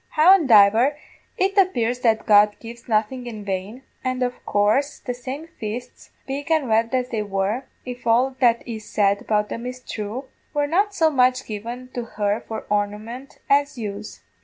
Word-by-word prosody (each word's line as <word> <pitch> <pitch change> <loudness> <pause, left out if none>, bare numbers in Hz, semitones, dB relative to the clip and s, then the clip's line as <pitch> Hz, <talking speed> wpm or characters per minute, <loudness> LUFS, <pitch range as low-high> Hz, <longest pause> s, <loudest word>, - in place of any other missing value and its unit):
Howandiver, 270 - +6 0.4
it 390 +1 +1
appears 245 -11 +1
that 225 -3 +1
God 210 0 +5
gives 235 0 -11
nothing 240 +3 0
in 215 -3 -7
vain, 200 +6 -4 0.2
and 255 0 -1
of 245 0 -4
coorse 215 +8 +2
the 245 - -5
same 260 +5 -6
fists, 245 -5 -8 0.2
big 280 +3 -5
and 315 -4 +2
red 225 +1 +2
as 250 -1 -1
they 225 -3 -2
were, 205 +5 -2 0.2
if 245 -1 -7
all 250 +3 +3
that 235 -2 +3
is 220 -2 -6
said 200 -1 +1
about 210 -1 0
them 235 +2 -5
is 250 0 -5
thrue, 225 +1 -6 0.3
were 290 0 +2
not 395 +7 +1
so 320 -4 +3
much 255 -1 +2
given 235 +4 -6
to 245 - -3
her 205 +1 +1
for 220 - -5
ornament 210 +6 -3
as 285 -1 +2
use. 210 -2 -6
240 Hz, 170 wpm, -22 LUFS, 215-265 Hz, 0.4 s, Howandiver